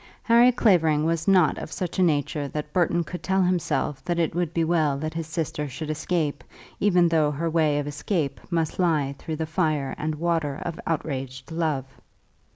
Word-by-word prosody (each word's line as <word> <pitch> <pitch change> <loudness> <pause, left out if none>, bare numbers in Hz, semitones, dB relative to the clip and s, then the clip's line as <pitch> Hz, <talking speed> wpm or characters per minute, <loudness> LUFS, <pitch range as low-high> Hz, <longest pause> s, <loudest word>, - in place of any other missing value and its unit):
Harry 240 +1 +6
Clavering 165 -10 +3
was 165 0 -1
not 185 -5 +4
of - - -7
such 180 +1 -4
a - - +4
nature 150 -3 +1
that 150 +1 -5
Burton 175 -1 +2
could 180 +2 -7
tell 190 0 +1
himself 175 -6 0
that 175 -1 -1
it 165 -2 +1
would 175 -1 -1
be 165 -1 0
well 160 -4 +2
that 155 +2 -4
his 165 -1 -4
sister 155 -2 -3
should 150 +4 -5
escape 155 -2 -1 0.4
even 180 -4 +4
though 160 -3 +3
her 160 +3 -2
way 155 -3 +2
of 145 - -1
escape 145 +1 -2
must 165 -2 -1
lie 155 -6 +2
through 160 - -4
the 160 +1 -2
fire 155 -4 0
and 155 0 -2
water 160 -3 -1
of 170 -2 -4
outraged 135 -4 -3
love. 155 -5 -1
160 Hz, 185 wpm, -25 LUFS, 150-175 Hz, 0.4 s, Harry